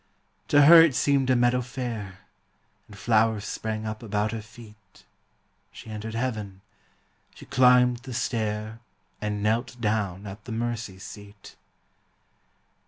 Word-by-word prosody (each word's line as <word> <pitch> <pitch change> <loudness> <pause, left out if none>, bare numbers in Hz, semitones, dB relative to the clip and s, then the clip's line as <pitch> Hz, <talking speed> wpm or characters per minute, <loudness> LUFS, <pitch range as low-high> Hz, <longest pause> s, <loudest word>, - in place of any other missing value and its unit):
To 145 0 +5
her 165 +2 +10
it 160 -6 +3
seemed 140 -2 +2
a 130 - +4
meadow 120 +1 +2
fair; 115 -6 -6 0.7
And 105 - -14
flowers 110 -2 +1
sprang 110 0 -4
up 110 0 -5
about 105 -1 -1
her 115 -1 -5
feet 110 0 -17 0.7
She 110 - -11
entered 110 +1 -6
heaven; 105 -6 -4 0.7
she - - -13
climbed 125 -1 +4
the 130 +1 -9
stair 110 -2 -3 0.4
And 105 -1 -3
knelt 115 +3 -1
down 105 -4 -1
at 100 +1 -9
the 125 - -8
mercy 115 -3 -4
seat. 100 +1 -12
110 Hz, 130 wpm, -26 LUFS, 105-125 Hz, 0.7 s, her